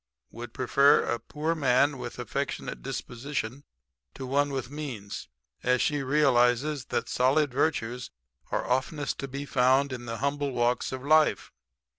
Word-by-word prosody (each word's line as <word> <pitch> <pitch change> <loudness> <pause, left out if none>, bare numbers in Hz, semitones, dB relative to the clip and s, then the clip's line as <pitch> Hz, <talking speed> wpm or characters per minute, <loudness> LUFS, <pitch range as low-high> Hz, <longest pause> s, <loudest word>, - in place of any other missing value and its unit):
Would 120 0 -8
prefer 140 +3 +4
a 120 - -1
poor 150 +8 -2
man 140 -2 +2
with - - -6
affectionate - - -4
disposition 125 - -5 0.5
to 130 - -6
one 140 +2 +1
with 135 -1 -4
means, 130 - -6 0.3
as 125 0 +2
she 145 -2 +1
realizes 135 0 +2
that - - -1
the - - -9
solid 135 +2 +2
virtues 125 -4 -1 0.4
are - - -2
oftenest 135 +3 -1
to 140 - -3
be 140 +2 -5
found 130 +1 +3
in 120 -1 -6
the 115 0 -4
humble 140 +1 -1
walks 120 0 +1
of 130 0 -5
life. 155 +1 +3
135 Hz, 150 wpm, -28 LUFS, 125-145 Hz, 0.5 s, prefer